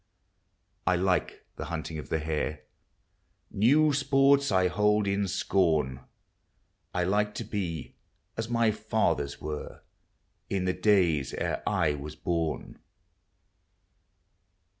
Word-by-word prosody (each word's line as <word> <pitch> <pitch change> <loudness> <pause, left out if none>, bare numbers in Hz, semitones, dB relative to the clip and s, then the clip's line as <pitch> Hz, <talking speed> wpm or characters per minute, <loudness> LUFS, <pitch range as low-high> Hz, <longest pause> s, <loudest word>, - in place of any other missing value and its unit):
I 90 - +4
like 90 0 0
the - - -4
hunting 80 0 -5
of - - -9
the - - +1
hare; 75 -1 -2 0.9
New 145 +9 +4
sports 140 -1 +3
I 95 -1 +3
hold 105 +2 +2
in 100 0 0
scorn. 80 -8 +1 0.9
I 90 - 0
like 105 +3 +1
to - - -3
be 85 -6 -4 0.4
as 115 0 -4
my 115 -2 +3
fathers 105 -9 -1
were, 75 -1 -6 0.7
In 95 -2 -1
the 90 - +1
days 85 -11 +2
ere - - -2
I 80 -3 +2
was 75 +1 -7
horn. 80 0 -3
95 Hz, 115 wpm, -28 LUFS, 80-105 Hz, 0.9 s, I